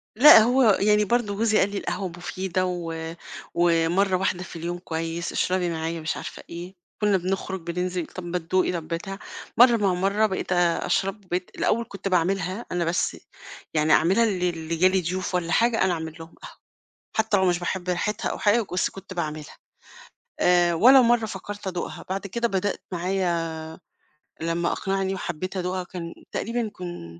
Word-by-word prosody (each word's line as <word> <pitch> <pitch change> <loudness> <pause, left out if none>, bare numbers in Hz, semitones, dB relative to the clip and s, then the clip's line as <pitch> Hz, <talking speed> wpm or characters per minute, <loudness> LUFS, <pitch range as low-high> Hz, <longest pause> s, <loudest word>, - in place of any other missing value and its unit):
لأ، 270 +2 +10
هو 245 +4 +4 0.2
يعني 210 +1 +4
برضه 225 -2 0
جوزي 215 +1 +2
قال 195 - +3
لي: 200 - -4
"القهوة 195 -1 -3
مفيدة 185 +1 -3
و 165 -2 -4 0.4
ومرّة 175 +3 +2
واحدة 185 -1 -1
في 185 - -10
اليوم 170 +1 -4
كويس، 165 0 -4
اشربي 180 -1 0
معايا، 165 0 -3
مش 155 - -2
عارفة - - -8
إيه." 175 +3 -8 0.3
كنا 205 -2 +3
بنخرج 190 +1 -3
بننزل، 180 0 -2
"طَب 185 - -8
ما 175 +1 -2
تدوقي، 180 +2 +1
طَب 165 -3 -4
بتاع." 195 +4 -5 0.4
مرّة 240 0 +7
مع 200 -4 +2
مرّة، 200 +4 +2
بقيت 190 -2 -3
أ 175 -2 +2
أشرب، 195 +1 -1
وبقيت 180 0 -3
الأول 235 +2 +1
كنت 200 0 -6
باعملها 185 +3 0
أنا 175 -1 0
بس، 170 +2 0 0.6
يعني 155 0 +3
أعملها 190 +9 +4
ل 180 -6 -2
ل 165 -1 -2
جا 185 - +6
لي 190 0 +2
ضيوف 185 +2 -3
والّا 175 -1 -1
حاجة، 230 +4 +3
أنا 190 -1 +2
أعمل 160 -1 -5
لهم 165 +1 -11
قهوة، - - -11 0.6
حتى 220 -1 +2
لو 190 - +2
مش 175 -1 +2
باحب 180 +1 -3
ريحتها 205 +5 -1
أو - - -4
حاجة، 215 +1 +3
بس 180 - +1
كنت 195 0 -10
باعملها، 155 -3 -5 0.8
آآ، 175 -1 +4
ولا 255 +10 +7
مرّة 235 -1 +3
فكرت 205 0 -7
أدوقها، 180 -2 -4
بعد 195 +2 -3
كده 235 +4 -1
بدأت 195 -1 -1
معايا 175 -2 0 0.9
لمّا 165 +1 0
أقنعني 195 0 -1
وحبيت 185 +1 -4
أدوقها، 180 0 -2
كان 175 -2 -7 0.2
تقريبًا 230 0 -2
كن 175 - -8
185 Hz, 175 wpm, -25 LUFS, 170-200 Hz, 0.9 s, لأ